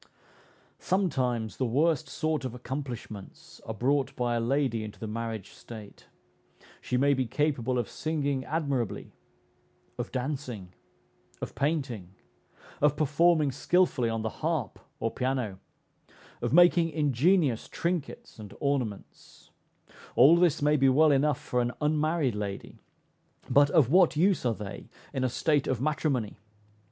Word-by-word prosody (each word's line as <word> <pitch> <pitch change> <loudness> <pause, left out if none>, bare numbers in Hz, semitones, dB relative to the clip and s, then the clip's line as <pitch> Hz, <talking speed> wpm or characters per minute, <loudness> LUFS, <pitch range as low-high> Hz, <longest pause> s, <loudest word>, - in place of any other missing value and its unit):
Sometimes 125 - -1
the 130 - 0
worst 155 +4 +1
sort 155 -1 -1
of 125 -2 -4
accomplishments 125 -5 -7
are 110 - -3
brought 135 +4 0
by 120 -1 0
a 120 - +1
lady 120 -1 0
into 105 -1 -9
the - - -5
marriage 110 -2 -5
state: 110 -3 -12 0.7
she 125 - -1
may 140 +2 +4
be 130 -2 -1
capable 130 -3 0
of 120 - -1
singing 145 -4 -2
admirably, 140 -8 -2 0.9
of - - -4
dancing, 125 -8 -4 0.7
of - - -6
painting, 130 - -2 0.7
of 150 0 +3
performing 155 0 +3
skilfully 145 -4 +1
on 115 -1 -2
the 110 - -4
harp 155 - -2 0.2
or 115 - -1
piano, 125 -7 -2 0.8
of - - -1
making 175 +1 +5
ingenious 150 - +2
trinkets 170 -9 -4
and 105 -2 -10
ornaments; 130 -8 -4 0.6
all 140 +7 +7
this 170 -4 +2
may 150 +1 +4
be 135 -1 +4
well 150 +4 +5
enough 145 +2 +2
for 125 - -1
an 120 0 -1
unmarried 155 -2 +1
lady, 105 -1 -6 0.7
but 145 0 +5
of 140 -5 +3
what 180 -2 +5
use 180 -5 +2
are 115 - 0
they 105 -1 -8 0.2
in 130 - -1
a 130 - +2
state 145 +3 +1
of 130 - 0
matrimony? 140 -6 -1
135 Hz, 135 wpm, -28 LUFS, 115-155 Hz, 0.9 s, all